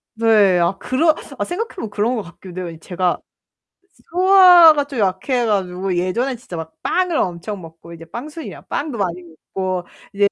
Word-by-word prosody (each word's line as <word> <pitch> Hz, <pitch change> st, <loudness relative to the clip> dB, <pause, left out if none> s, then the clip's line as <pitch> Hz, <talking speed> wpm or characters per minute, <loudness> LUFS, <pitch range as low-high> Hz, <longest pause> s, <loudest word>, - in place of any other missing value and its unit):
네, 210 Hz, -5 st, +4 dB
아 175 Hz, +3 st, +1 dB
그런 310 Hz, +8 st, +2 dB, 0.2 s
아 -, -, +1 dB
생각해보면 365 Hz, -, -5 dB
그런 220 Hz, +4 st, 0 dB
것 -, -, -2 dB
같기도 180 Hz, +1 st, -8 dB
해요. 165 Hz, -1 st, -8 dB
제가 180 Hz, -1 st, -1 dB, 0.9 s
소화가 355 Hz, -5 st, +7 dB
좀 275 Hz, -5 st, -6 dB
약해 210 Hz, +6 st, 0 dB
가지고 190 Hz, -3 st, -1 dB
예전에 235 Hz, +9 st, -1 dB
진짜 225 Hz, -7 st, -10 dB
막 160 Hz, 0 st, -7 dB
빵을 365 Hz, -2 st, 0 dB
엄청 185 Hz, -, -2 dB
먹고 165 Hz, +1 st, -13 dB
이제 165 Hz, 0 st, -11 dB
빵순이야. 295 Hz, -, -8 dB
빵도 285 Hz, -5 st, -4 dB
많이 180 Hz, -3 st, -2 dB
먹고 180 Hz, +2 st, -5 dB, 0.3 s
이제 200 Hz, 0 st, +3 dB
205 Hz, 320 characters per minute, -19 LUFS, 180-280 Hz, 0.9 s, 소화가